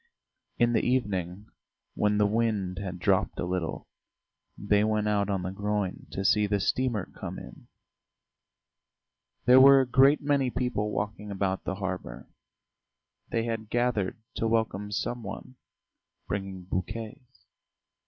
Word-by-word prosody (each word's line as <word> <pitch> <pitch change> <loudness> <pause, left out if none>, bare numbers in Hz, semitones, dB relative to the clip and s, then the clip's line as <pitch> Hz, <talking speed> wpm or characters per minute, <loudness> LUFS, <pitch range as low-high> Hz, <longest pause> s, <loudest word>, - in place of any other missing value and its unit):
In 120 0 +3
the - - +2
evening 100 -6 -1 0.4
when 105 0 +1
the 105 - +4
wind 105 -4 0
had 95 -3 -5
dropped - - +1
a - - -1
little, 90 -2 -3 0.7
they 105 +1 +2
went 110 -1 +1
out 105 -1 +1
on 95 -2 -1
the 95 - -3
groyne 100 -1 -2
to 95 - -4
see 105 +1 +4
the 100 0 +1
steamer 120 0 0
come - - -8
in. - - -11 1.8
There 125 +1 +8
were 135 0 +9
a 130 - -1
great 135 +4 +5
many 140 -3 +1
people 125 -4 -1
walking 105 0 -4
about 95 -1 -2
the 95 - -2
harbour; 95 -2 -5 1.0
they 115 - 0
had 115 -2 -4
gathered 120 -5 0 0.2
to 115 - 0
welcome 110 -3 0
some 120 +4 -2
one, 130 +2 -8 0.7
bringing 95 -2 -4
bouquets. 110 +7 -6
105 Hz, 135 wpm, -28 LUFS, 95-120 Hz, 1.8 s, were